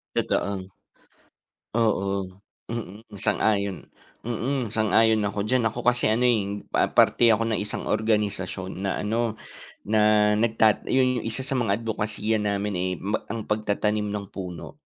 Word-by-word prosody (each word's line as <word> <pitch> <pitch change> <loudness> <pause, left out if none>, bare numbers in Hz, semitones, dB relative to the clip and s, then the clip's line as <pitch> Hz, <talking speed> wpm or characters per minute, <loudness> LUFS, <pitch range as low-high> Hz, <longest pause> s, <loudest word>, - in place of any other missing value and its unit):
Totoo, 100 -2 -1 1.1
oo, 110 -4 +2 0.6
mm, 110 -1 -7
sang-ayon, 100 -2 0 0.4
mm, 120 +1 -2
sang-ayon 110 0 +3
ako 100 0 -2
diyan 120 +2 +1
ako 115 +3 -2
kasi 125 0 +2
ano 110 +3 +2
eh, 105 -5 +1
pa - - +2
parte 120 - +5
ako 115 +1 -1
ng 110 - 0
isang 105 0 -3
organisasyon 100 -3 -1
na 95 - -1
ano 115 +1 0 0.5
na 105 0 +4
nagtat 110 0 +2
'yun 130 -1 +2
'yung - - -10
isa 130 +4 -4
sa 135 - -3
mga 115 -6 +1
adbokasiya 110 -1 -2
namin 105 0 -1
eh, 90 0 -1
ma 100 +5 -2
ang 115 -2 -4
pagtatanim 105 0 0
ng 100 -1 -5
puno. 90 -3 -8
105 Hz, 140 wpm, -25 LUFS, 100-115 Hz, 1.1 s, parte